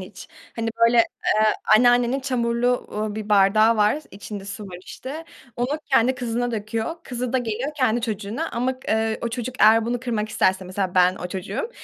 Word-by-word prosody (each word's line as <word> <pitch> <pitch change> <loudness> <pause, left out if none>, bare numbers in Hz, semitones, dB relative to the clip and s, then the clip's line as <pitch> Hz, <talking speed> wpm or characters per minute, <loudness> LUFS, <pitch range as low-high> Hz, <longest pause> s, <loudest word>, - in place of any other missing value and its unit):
hiç? 190 +1 -11 0.3
Hani, 225 0 -2
böyle, 230 +1 +5
eee, 215 -1 +2 0.3
anneannenin 245 +2 +3
çamurlu, 245 -1 0
uuu, 210 0 -3
bir 215 -1 -6
bardağı 215 +3 +4
var, 210 +7 +3
içinde 200 0 -8
su 200 +1 -7
var 180 -1 -9
işte. 300 +5 -8 0.3
Onu 260 +6 -1
kendi 260 0 +4
kızına 245 -1 -2
döküyor. 225 +7 -3
Kızı 250 -1 -4
da 260 - +3
geliyor 245 +4 -3
kendi 245 -3 +1
çocuğuna 220 +6 -3
ama 255 +2 -2
k - - -11 0.2
eee, 220 - -3
o 235 - -1
çocuk 240 +2 -5
eğer 220 +1 +6
bunu 245 0 -2
kırmak 225 -4 -2
isterse, 190 -2 +1
mesela 185 0 -3
ben 180 0 +4
o 180 - -6
çocuğum, 195 - -4
230 Hz, 180 wpm, -23 LUFS, 210-245 Hz, 0.3 s, eğer